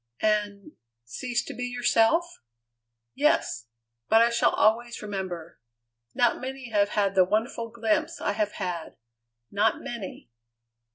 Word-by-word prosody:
"And 205 -2 0 0.3
cease 235 - -3
to - - -7
be 250 - -4
yourself?" 245 +7 +2 0.7
"Yes. 270 - +1 0.4
But 225 +1 +6
I 235 - +3
shall 235 - +3
always 235 +2 +1
remember. 185 -5 -5 0.6
Not 240 - +2
many 260 -2 -6
have 205 -1 +3
had 200 -2 +2
the 190 -1 +6
wonderful 225 +4 -1
glimpse 225 -2 -1
I - - 0
have 210 0 -1
had 180 -4 -5 0.5
not 210 +2 +2
many." 200 - -7
220 Hz, 125 wpm, -27 LUFS, 200-240 Hz, 0.7 s, But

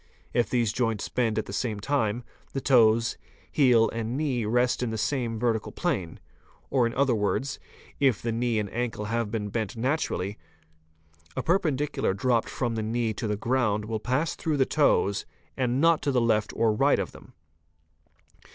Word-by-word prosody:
If 120 -1 +2
these 120 -4 +1
joints 115 -4 -1
bend 115 -3 0
at 110 - 0
the - - -8
same 105 +1 -2
time, 120 -1 0 0.3
the 135 - -1
toes, 115 -4 +4 0.3
heel, 125 -6 +5
and 115 +2 -3
knee 135 -7 0
rest 120 +4 +1
in 125 - 0
the 110 - -3
same 115 0 -1
vertical 115 -1 0
plane, 105 - -2 0.5
or 125 -3 +3
in 115 - -5
other 135 -2 +3
words, 115 +6 -1 0.4
if 135 -7 +3
the 115 - -2
knee 115 0 0
and 105 -1 0
ankle 115 -3 -2
have 115 0 -1
been 105 -1 -3
bent 110 0 -3
naturally, 115 - -1 1.0
a - - -1
perpen 165 -5 +2
dicular 145 -9 -1
dropped 120 +1 +1
from 120 -3 -2
the 110 - -2
knee 115 +1 -1
to 110 - -4
the 105 -1 -1
ground 110 -3 0
will 110 0 -3
pass 130 +7 0
through 155 -2 -1
the 135 - +4
toes 110 -10 +2 0.3
and 125 -1 0
not 165 +1 +4
to 145 - 0
the 130 - +2
left 110 -3 +1
or 115 -1 +2
right 105 - +3
of - - -3
them. - - -15
115 Hz, 180 wpm, -27 LUFS, 110-130 Hz, 1.0 s, heel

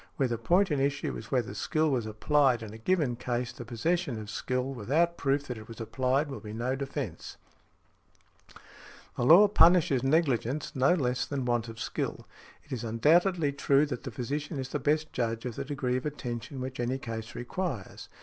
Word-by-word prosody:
Where 135 - +1
the 120 -2 -3
point 180 - +3
in 145 - +1
issue 140 +1 -1
is - - -8
whether 125 -5 0
skill 155 -1 0
was 120 -5 0
applied 125 +2 +2
in 105 -1 -8
a 110 - -10
given 145 -2 +1
case, 120 0 -2
the - - -8
possession 130 +3 -1
of 105 -1 -7
skill 125 +4 -2
without 150 +9 +1
proof 140 -1 0
that 125 -5 -5
it 110 - -12
was 115 - -10
applied 130 +5 0
will 135 - -6
be 105 -2 -8
no 120 +4 -1
defence. 135 0 -5 1.8
The - - -2
law 170 +11 +8
punishes 170 -8 +5
negligence 135 -2 +1
no 135 +6 +4
less 125 -6 0
than 140 -3 -2
want 120 -1 0
of 115 -1 -9
skill. - - -3 0.4
It 145 - -22
is 125 -3 -3
undoubtedly 155 - +3
true 140 +1 +3
that 130 -5 -5
the 135 - -6
physician 145 +6 -4
is 130 -1 -4
the - - -2
best 155 +1 0
judge 115 -1 -2
of 120 -3 -4
the - - -3
degree 130 -3 -1
of 130 - -5
attention 130 -2 -5
which 130 0 -5
any 120 +2 0
case 115 -3 -6
requires. 125 - -4
130 Hz, 190 wpm, -29 LUFS, 120-150 Hz, 1.8 s, law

